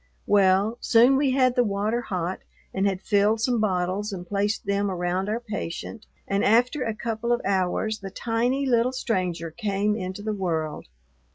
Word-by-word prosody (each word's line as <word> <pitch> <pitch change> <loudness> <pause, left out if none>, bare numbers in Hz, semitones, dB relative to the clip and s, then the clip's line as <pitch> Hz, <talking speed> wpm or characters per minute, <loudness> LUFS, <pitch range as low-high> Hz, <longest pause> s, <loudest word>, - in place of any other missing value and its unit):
Well, 200 +3 +3
soon 240 +3 +5
we 275 0 +2
had 255 -1 +3
the 245 - +4
water 210 +2 -1
hot 185 -4 -3 0.3
and 195 +1 +1
had 190 -1 -2
filled 210 +2 +2
some 240 +1 +1
bottles 190 +1 -1
and 180 -2 -6
placed 205 +2 -1
them 200 0 0
around 180 +2 -1
our 220 +2 -1
patient, 215 -1 -6 0.2
and 195 0 0
after 245 +6 +3
a 225 -3 -2
couple 230 +1 -3
of 240 - +2
hours 200 +3 0
the 195 - -7
tiny 240 +6 -1
little 245 0 +2
stranger 180 -9 -2
came 205 +3 -1
into 190 -1 -5
the 215 0 -2
world. 165 -6 -3
205 Hz, 170 wpm, -25 LUFS, 190-230 Hz, 0.3 s, soon